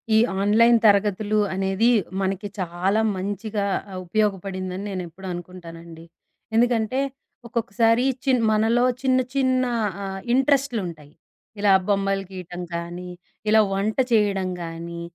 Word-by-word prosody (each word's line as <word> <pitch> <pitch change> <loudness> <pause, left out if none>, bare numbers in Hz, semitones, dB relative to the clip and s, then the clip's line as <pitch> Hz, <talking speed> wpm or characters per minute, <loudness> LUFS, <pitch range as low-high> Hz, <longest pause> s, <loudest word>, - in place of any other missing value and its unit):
ఈ - - +6 0.2
ఆన్‌లైన్ 230 +4 +5
తరగతులు 205 +1 +2 0.2
అనేది, 195 +4 +2 0.3
మనకి 195 +2 -2
చాలా 185 +4 0 0.2
మంచిగా 205 +2 -3 0.4
ఉపయోగపడిందని 190 -1 -2
నేనెప్పుడూ 185 -1 -6
అనుకుంటానండి. 170 -2 -10 0.5
ఎందుకంటే, 240 +1 +2 0.5
ఒక్కొక్కసారి 230 +1 +1 0.2
చిన్ 255 -3 +3
మనలో 225 +3 +3 0.2
చిన్న, 260 -1 +3 0.2
చిన్న 260 -1 +2 0.4
ఆహ్, 195 0 -5
ఇంట్రెస్ట్‌లుంటాయి. 240 - 0 0.5
ఇలా 200 -1 +4
బొమ్మలు 195 -1 +1
గీటం 180 -1 -7
కానీ, 175 +1 -6 0.4
ఇలా 220 0 +6
వంట 200 +3 -1
చేయడం 200 -4 +2
గానీ, 170 +1 -7
200 Hz, 105 wpm, -23 LUFS, 180-225 Hz, 0.5 s, ఈ